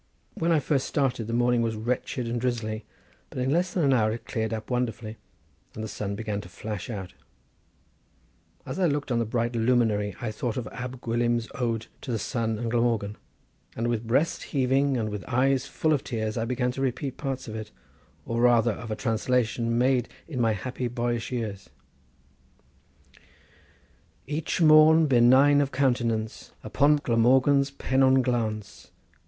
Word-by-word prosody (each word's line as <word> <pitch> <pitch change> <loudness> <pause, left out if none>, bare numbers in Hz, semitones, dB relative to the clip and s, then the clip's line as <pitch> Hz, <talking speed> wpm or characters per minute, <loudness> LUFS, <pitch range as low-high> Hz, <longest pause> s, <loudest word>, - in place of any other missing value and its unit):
When 170 +1 0
I 160 - +4
first 140 -1 0
started 125 -6 -1
the 115 - -3
morning 120 0 +2
was 115 -1 -1
wretched 120 +2 -2
and 120 0 -2
drizzly, 115 -3 -2 0.4
but - - -11
in 130 +1 0
less 175 +3 +1
than 175 - 0
an 135 -2 +4
hour 110 -4 +3
it 115 0 -6
cleared 110 -1 -2
up 110 +2 -5
wonderfully, 115 -3 -2 0.6
and 110 - -5
the - - -3
sun 100 -1 -4
began 105 -1 -3
to - - -12
flash 105 -1 -6
out. 95 -5 -6 1.5
As - - -5
I 180 - +3
looked 145 -3 -2
on 120 - +2
the 115 - 0
bright 120 +1 -1
luminary 110 -4 +1
I 120 -4 -3
thought 115 +2 -3
of 125 - -3
Ab 125 0 -7
Gwilym's 120 0 0
ode 115 -3 -2 0.2
to 130 - -5
the 115 - 0
sun 115 -1 -2
and 115 +1 -3
Glamorgan, 115 -4 0 0.6
and 115 +1 -1
with 115 -1 -2
breast 140 +8 +1
heaving 135 0 +1
and 110 -2 -1
with 105 -1 -5
eyes 130 +1 +1
full 155 -1 0
of 145 -2 0
tears, 110 -3 -3
I 115 - -1
began 125 +1 -1
to 135 - -5
repeat 135 +1 -2
parts 135 -2 -4
of 110 - -6
it, 110 -1 -6 0.6
or 115 0 -1
rather 120 -1 +4
of 110 +2 -7
a 110 - -2
translation 115 0 0
made 125 -1 +2 0.2
in 130 -6 -3
my 115 -2 +3
happy 125 +4 -4
boyish 120 0 -2
years: 105 -6 -4 2.6
"Each 150 +6 -2
morn, 155 +1 +7
benign 135 +2 +5
of 140 -1 -1
countenance, 120 -5 -1
Upon 145 +2 +3
Glamorgan's 135 +2 +3
pennon 130 -1 +2
glance! 110 -4 -3
120 Hz, 170 wpm, -26 LUFS, 110-130 Hz, 2.6 s, morn